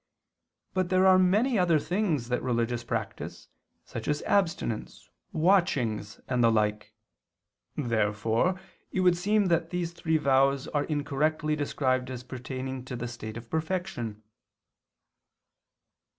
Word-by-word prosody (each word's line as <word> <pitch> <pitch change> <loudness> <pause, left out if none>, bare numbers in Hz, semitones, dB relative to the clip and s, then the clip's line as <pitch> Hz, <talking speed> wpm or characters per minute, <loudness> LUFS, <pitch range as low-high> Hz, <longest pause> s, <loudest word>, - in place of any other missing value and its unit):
But 185 -2 0
there 185 0 +4
are 185 -1 +7
many 210 +6 +3
other 170 -3 +4
things 160 - -1
that 125 - 0
religious 120 -1 -1
practice, 115 -3 -5 0.4
such 115 - -6
as 150 0 0
abstinence, 165 - -1 0.2
watchings, 135 - +1
and 125 -2 +1
the 115 - +5
like. 105 -1 0 0.8
Therefore 115 - +1 0.3
it 190 - 0
would 180 -1 +5
seem 205 +4 +2
that 165 -1 +1
these 175 -1 -2
three 160 -2 0
vows 135 -1 +3
are 145 -1 0
incorrectly 150 +1 0
described 130 -3 0
as 125 -1 -6
pertaining 130 +1 -5
to 130 - -5
the 120 0 -4
state 115 -2 -7
of 115 0 -9
perfection. 160 - -3
140 Hz, 125 wpm, -28 LUFS, 120-175 Hz, 0.8 s, are